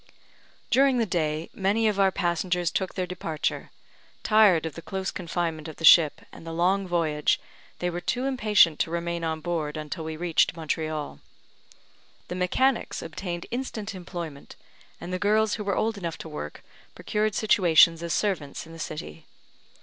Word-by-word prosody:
During 265 +1 +4
the 230 - +2
day, 160 -4 -2
many 210 +3 +1
of 205 -2 0
our 195 -1 +4
passengers 175 -1 0
took 190 -1 -2
their 185 - -1
departure; 165 -4 -3 0.5
tired 210 -7 +5
of 160 - -4
the 165 - -8
close 190 +2 -4
confinement 165 -3 -3
of 160 - -8
the 165 - -2
ship, 160 -2 +7
and - - -12
the 165 - -7
long 185 +4 +1
voyage, 160 -4 +1 0.4
they 180 - -2
were 175 0 -3
too 250 +6 -1
impatient 210 - +4
to - - 0
remain 170 0 -3
on 160 -1 -2
board 160 -2 -2
until 155 +2 -5
we 160 0 -5
reached 170 -1 +2
Montreal. 155 - -3 1.1
The - - -3
mechanics 230 +8 0
obtained 175 +1 -5
instant 235 -5 -4
employment, 170 -5 -8 0.4
and 175 +1 -6
the 185 - -1
girls 215 0 +2
who 210 - -3
were 200 -2 -1
old 220 -2 0
enough 170 -3 -4
to - - -8
work, 75 - -7 0.3
procured 210 -1 -1
situations 170 -6 +5
as 170 -1 -4
servants 160 -7 -1
in 165 - -13
the 165 - -11
city. 80 - -7
175 Hz, 165 wpm, -26 LUFS, 160-200 Hz, 1.1 s, ship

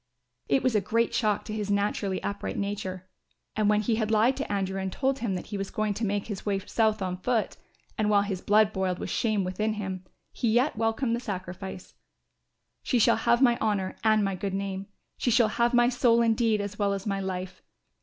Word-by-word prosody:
It 140 -1 +3
was 255 - +2
a 210 - +3
great 230 +4 0
shock 210 -2 +1
to 215 - -5
his 210 -2 -3
naturally 200 -1 0
upright 200 - -3
nature 195 -2 -4 0.5
and 215 -1 +2
when 210 0 +3
he 220 +1 0
had 220 -2 -1
lied 225 +4 +3
to - - -4
Andrew 195 -1 -1
and 190 0 -3
told 270 +5 0
him 220 -6 -1
that 180 - -5
he 200 - -2
was 195 - -3
going 215 -1 -1
to 220 - -5
make 200 0 -1
his 205 -4 -6
way 200 -2 0
south 215 +1 0
on 180 -1 -2
foot, 225 +4 -1 0.4
and 210 -1 +2
while 205 -1 +4
his 195 -3 -4
blood 215 0 +3
boiled 190 -2 -1
with - - -5
shame 215 -4 +1
within 210 +4 -1
him, 190 -3 -5 0.3
he 235 - -1
yet 250 +6 +2
welcomed 225 +2 0
the - - -3
sacrifice. 190 -4 -6 0.9
"She 250 - 0
shall 230 - +5
have 235 +2 +3
my 240 -2 +4
honour 200 -4 -1
and 215 -1 +4
my 195 - -1
good 195 +1 -3
name, 195 0 -4 0.3
she - - +1
shall 230 -2 +4
have 235 +2 +1
my 240 -1 +4
soul 235 -2 +3
indeed 225 -2 +2
as 205 +1 -6
well 200 -1 +2
as 195 -1 -4
my 200 -2 -1
life. 185 -1 -5
210 Hz, 215 wpm, -27 LUFS, 195-225 Hz, 0.9 s, shall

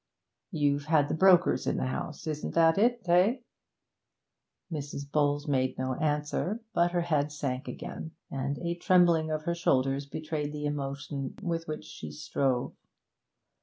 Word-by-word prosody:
'You've 145 -5 +1
had 150 -2 +3
the - - 0
brokers 180 +1 +4
in - - +1
the - - 0
house 140 +3 -4
isn't 155 -1 -4
that 165 +2 +5
it, 235 -2 +2
eh?' 180 +8 +4 1.3
Mrs. 145 -2 -4
Bowles 145 -1 +1
made 130 -2 +1
no 130 0 -1
answer, 150 - -1
but 170 0 +3
her 175 0 0
head 150 -3 0
sank 140 -2 -3
again, 160 - -6 0.2
and 140 +1 -2
a 170 -1 -2
trembling 170 -2 +4
of 155 0 -2
her 170 - 0
shoulders 135 -4 +1
betrayed 150 0 -4
the 150 0 -4
emotion 140 -1 -4
with 165 -2 -2
which 155 0 -5
she 75 - -8
strove. 125 - -1
150 Hz, 150 wpm, -29 LUFS, 140-170 Hz, 1.3 s, that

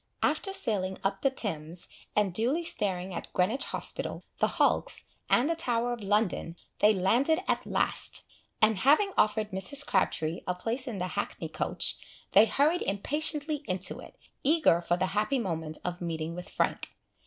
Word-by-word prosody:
After 390 - +1
sailing 190 - +1
up 195 0 -1
the 275 - +4
Thames, 170 - -5 0.3
and 205 -3 +2
duly 250 - +1
staring 190 - -1
at 170 - -6
Greenwich 210 +9 +1
hospital, - - -4 0.2
the - - +4
hulks, - - +2 0.2
and 250 - +4
the 335 - +1
Tower 245 -6 0
of 235 - -6
London, 200 -4 0 0.2
they 210 - +6
landed 235 - +2
at - - 0
last; - - +1 0.4
and 215 -3 +4
having 310 - +4
offered 215 0 +2
Mrs. 195 +10 +1
Crabtree 165 -3 0
a 180 - 0
place 235 +8 -2
in 230 -5 -4
the 180 0 -2
hackney - - -4
coach, - - -2 0.3
they 210 +3 +7
hurried 305 +8 +2
impatiently 295 +8 0
into 185 -1 -2
it, - - -12 0.3
eager 295 - +4
for 175 0 0
the 185 - +1
happy 215 +7 +1
moment 160 -8 -3
of 180 0 -3
meeting 165 -1 -3
with 180 +1 -7
Frank. - - -1
210 Hz, 165 wpm, -29 LUFS, 180-270 Hz, 0.4 s, they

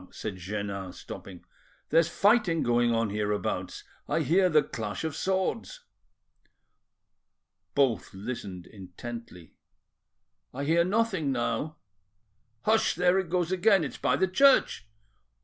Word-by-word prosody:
said 100 -4 -6
Jeannin, 100 0 -5
stopping, 90 0 -10 0.4
"There's 165 +1 +4
fighting 200 -4 +3
going 120 0 +2
on 115 -2 0
hereabouts; 105 0 -2 0.3
I - - +1
hear 185 +3 +3
the 155 -3 +4
clash 110 +2 -5
of 160 -2 -3
swords." 190 - -2 1.9
Both 135 -6 +1
listened 95 -3 -6
intently. 95 -1 -10 1.0
"I - - -3
hear 165 +4 +3
nothing 190 -6 0
now." 125 +4 -2 0.9
"Hush! 220 +1 +2
there 180 +2 +3
it 190 -3 -3
goes 175 0 0
again. 190 0 +4
It's 145 - -5
by - - +2
the 190 - +2
church." 260 - +3
145 Hz, 115 wpm, -28 LUFS, -, 1.9 s, There's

